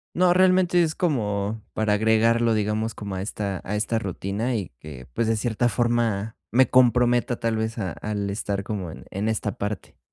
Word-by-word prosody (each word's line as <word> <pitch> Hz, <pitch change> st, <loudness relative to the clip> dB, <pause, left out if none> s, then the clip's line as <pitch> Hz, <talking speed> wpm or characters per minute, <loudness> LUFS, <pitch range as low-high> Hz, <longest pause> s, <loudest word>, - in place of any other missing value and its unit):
No, 180 Hz, 0 st, +4 dB
realmente 185 Hz, -1 st, +4 dB
es 160 Hz, -2 st, 0 dB
como 110 Hz, -, -1 dB
para 110 Hz, -1 st, +1 dB
agregarlo, 110 Hz, +2 st, +3 dB
digamos, 110 Hz, +1 st, -1 dB
como 100 Hz, -2 st, -6 dB
a 95 Hz, -, -3 dB
esta 100 Hz, -2 st, -3 dB
a 105 Hz, -, -2 dB
esta 110 Hz, +2 st, 0 dB
rutina 105 Hz, +4 st, -2 dB
y 100 Hz, -5 st, -4 dB
que, 70 Hz, -5 st, -10 dB
pues, 115 Hz, -, 0 dB
de 115 Hz, -, +2 dB
cierta 120 Hz, +1 st, 0 dB
forma, 115 Hz, -3 st, 0 dB
me 130 Hz, +2 st, +4 dB
comprometa, 120 Hz, -1 st, +3 dB
tal 115 Hz, -1 st, 0 dB
vez, 110 Hz, +1 st, -2 dB
a 95 Hz, -6 st, -2 dB
al 100 Hz, -2 st, -3 dB
estar 100 Hz, -1 st, -3 dB
como 100 Hz, -5 st, -4 dB
en -, -, -11 dB
en 100 Hz, +3 st, -2 dB
esta 110 Hz, -1 st, -1 dB
parte. 105 Hz, 0 st, -5 dB
110 Hz, 185 wpm, -24 LUFS, 100-120 Hz, -, No